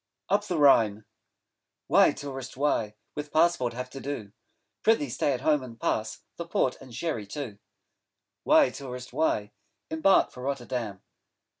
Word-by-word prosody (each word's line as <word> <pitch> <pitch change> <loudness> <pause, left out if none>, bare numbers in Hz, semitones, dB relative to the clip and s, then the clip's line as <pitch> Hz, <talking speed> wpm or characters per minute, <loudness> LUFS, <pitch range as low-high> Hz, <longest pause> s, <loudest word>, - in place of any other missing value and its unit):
'UP 205 +1 +3
THE 185 -5 -2
RHINE' 110 -8 +5 0.8
Why, - - +5
Tourist, 135 -2 -7
why 115 -7 0 0.2
With 150 0 -6
Passport 155 -7 +3
have 125 +1 -6
to 135 - -7
do? 135 -8 -5 0.5
Pr'ythee 180 - +3
stay 145 - +1
at 125 -2 -2
home 150 0 +3
and 115 -3 -10
pass 110 -1 -1 0.2
The 170 - -5
Port 130 -6 +1
and 130 - -12
Sherry 115 -4 -3
too. 110 -3 -6 0.8
Why, - - +5
Tourist, 125 -2 -8
why 105 -9 0 0.4
5 160 - -2
Embark 195 +4 +5
for 125 - -10
Rotterdam? 125 -6 -3
130 Hz, 150 wpm, -28 LUFS, 115-150 Hz, 0.8 s, RHINE